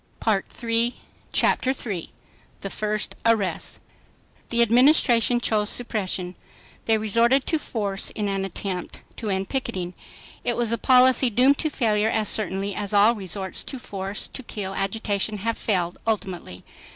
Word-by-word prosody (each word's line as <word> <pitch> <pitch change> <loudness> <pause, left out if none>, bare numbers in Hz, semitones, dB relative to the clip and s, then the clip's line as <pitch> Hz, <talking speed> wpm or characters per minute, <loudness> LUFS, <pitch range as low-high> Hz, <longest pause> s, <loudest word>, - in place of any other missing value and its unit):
Chapter 260 - +2
3 200 -10 -4 0.5
The 195 - -4
First 215 0 -2
Arrests 220 -4 0 0.7
The 235 0 +4
Administration 240 -1 +4
chose 215 -3 0
suppression. 190 -6 -1 0.5
They 225 -1 +3
resorted 230 +5 +2
to 320 - +1
force 200 -7 -2
in 210 -1 -3
an 195 -1 -1
attempt 190 -1 -5 0.2
to 220 - -4
end 190 0 -1
picketing. 190 -10 -3 0.5
It 240 - -1
was 235 -2 0
a 230 - +1
policy 255 -1 +5
doomed 255 +5 +4
to 315 - 0
failure 220 -6 +1
as 220 -2 +1
certainly 200 -1 0
as 205 +1 -2
all 210 +3 +6
resorts 190 -3 -4
to 270 - -3
force 200 -4 -4
to - - -6
kill 205 -5 -5
agitation 205 +1 -1
have 225 +3 -2
failed 180 -5 -1
ultimately. 185 - -3
215 Hz, 140 wpm, -24 LUFS, 195-235 Hz, 0.7 s, all